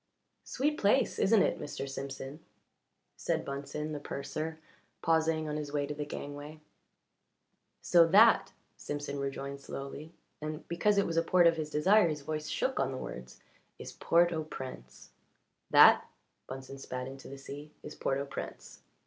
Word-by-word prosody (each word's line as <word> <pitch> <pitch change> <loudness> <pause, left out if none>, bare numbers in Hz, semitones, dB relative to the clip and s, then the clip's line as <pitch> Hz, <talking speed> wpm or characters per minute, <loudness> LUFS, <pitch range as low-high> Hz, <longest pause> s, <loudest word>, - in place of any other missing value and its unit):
"Sweet 295 +3 -1
place, 210 +7 +2
isn't 210 +1 +5
it, - - 0
Mr. 140 -1 -5
Simpson?" 135 +1 -6 0.8
said - - -1
Bunsen, 140 +2 -4
the 150 - -4
purser, 155 +3 -4 0.5
pausing 160 -1 +2
on 150 0 -2
his 150 -1 -5
way 145 -1 0
to 150 - -4
the 150 0 -5
gangway. 145 +2 -7 1.2
"So 170 -1 +6
that," 215 +7 +6 0.3
Simpson 145 -1 -4
rejoined 140 0 -4
slowly 140 +3 -7 0.3
and 155 +1 -5
because 200 +5 +2
it 200 - +4
was 165 - -2
a - - +5
port 175 +1 +4
of 165 -1 +5
his 155 -1 -3
desire 185 +7 +4
his 150 -1 -3
voice 155 +1 -4
shook 265 - -1
on 135 0 +1
the 130 - -4
words 65 - -8 0.4
"is - - -8
Port 170 +1 +3
au 160 -1 -2
Prince!" 130 - -9 0.6
"That," - - +7 0.4
Bunsen 135 +1 -8
spat 125 -1 -5
into 135 0 -9
the 140 - -8
sea, 145 +2 -9
"is 150 - -7
Port 135 - -1
au 140 - -2
Prince." 140 - -8
150 Hz, 160 wpm, -31 LUFS, 140-165 Hz, 1.2 s, That